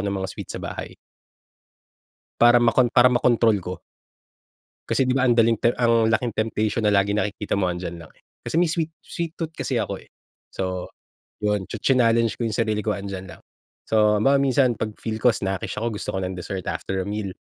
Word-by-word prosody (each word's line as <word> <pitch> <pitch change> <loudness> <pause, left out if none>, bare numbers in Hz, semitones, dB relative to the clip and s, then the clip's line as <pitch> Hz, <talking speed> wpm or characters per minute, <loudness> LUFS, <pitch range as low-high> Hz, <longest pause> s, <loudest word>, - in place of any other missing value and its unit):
ng 100 0 -2
mga 95 0 -3
sweet - - -8
sa - - -7
bahay. - - -6 1.4
Para 120 +1 +7
makon 120 +1 +3
para 120 +2 +6
ma-kontrol 120 -3 +3
ko 90 +1 -5 1.1
kasi 130 - +1
di 130 - +1
ba 130 - +3
andaling 115 -2 +4
ti 120 - +3
ang 115 -2 +3
laking 115 +1 0
temptation 110 0 0
na 105 - +3
laging 100 +1 +2
nakikita 105 -1 -2
mo 95 -2 +1
'andiyan 90 -1 -5
lang - - -17
eh, - - -30 0.2
kasi 165 - 0
may 175 - +3
sweet-sweet 165 0 -4
tooth 160 -1 -5
kasi - - -1
ako - - -3
eh. - - -26 0.4
So, 95 -1 -4 0.5
yun, 105 -2 0
chi - - -6
chinallenge 115 -3 +3
ko 120 - -3
yung 110 -2 -2
sarili 110 -2 0
ko 110 - +1
andiyan 100 -1 -5
lang. - - -14 0.5
So, 105 -1 +3
halimbawa 135 +6 +4
minsan 130 -3 +2
pag-feel 110 +1 -4
ko 125 - +5
snackish 95 -2 -3
ako 115 -1 -2
gusto - - -4
ko - - -1
ng 95 0 -4
dessert 90 +1 -5
after 95 0 -3
a 95 - -4
meal, 105 -2 -3
110 Hz, 190 wpm, -23 LUFS, 100-120 Hz, 1.4 s, Para